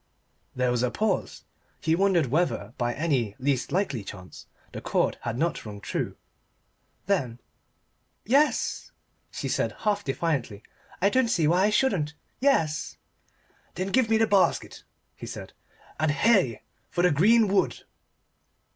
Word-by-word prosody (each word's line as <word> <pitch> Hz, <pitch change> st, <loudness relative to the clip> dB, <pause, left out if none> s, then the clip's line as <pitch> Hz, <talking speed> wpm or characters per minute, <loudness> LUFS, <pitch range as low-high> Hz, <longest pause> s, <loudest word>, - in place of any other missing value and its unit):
There 125 Hz, -1 st, +1 dB
was 120 Hz, -1 st, 0 dB
a 125 Hz, -, +1 dB
pause: 210 Hz, -, -2 dB, 0.4 s
he 160 Hz, -, +1 dB
wondered 185 Hz, -3 st, +3 dB
whether 130 Hz, -, -1 dB
by 120 Hz, -1 st, 0 dB
any 135 Hz, -10 st, 0 dB
least 135 Hz, -1 st, -1 dB
likely 155 Hz, -, -1 dB
chance 90 Hz, -2 st, -11 dB, 0.2 s
the -, -, -7 dB
chord -, -, 0 dB
had 115 Hz, -, -3 dB
not 165 Hz, +2 st, -1 dB
rung 105 Hz, -2 st, -8 dB
true. -, -, -3 dB, 0.9 s
Then 130 Hz, -12 st, -1 dB, 0.9 s
"Yes," 280 Hz, +7 st, +1 dB, 0.4 s
she -, -, -5 dB
said -, -, -1 dB
half 205 Hz, -1 st, 0 dB
defiantly. 135 Hz, -8 st, -2 dB, 0.4 s
"I 200 Hz, -, +6 dB
don't 260 Hz, 0 st, +3 dB
see 165 Hz, -8 st, +2 dB
why 180 Hz, +4 st, +3 dB
I -, -, +3 dB
shouldn't 195 Hz, -, +1 dB, 0.2 s
Yes." 165 Hz, -, +1 dB, 0.8 s
"Then 185 Hz, +2 st, -2 dB
give 255 Hz, -1 st, +3 dB
me 225 Hz, -, +4 dB
the 225 Hz, -, +4 dB
basket," 200 Hz, -3 st, +1 dB, 0.3 s
he -, -, -9 dB
said, -, -, -8 dB, 0.5 s
"and 155 Hz, 0 st, +2 dB
hey 150 Hz, -, +2 dB, 0.3 s
for 175 Hz, -, -1 dB
the 180 Hz, -, +5 dB
green 215 Hz, +9 st, +5 dB
wood!" 195 Hz, 0 st, 0 dB
165 Hz, 140 wpm, -26 LUFS, 125-205 Hz, 0.9 s, I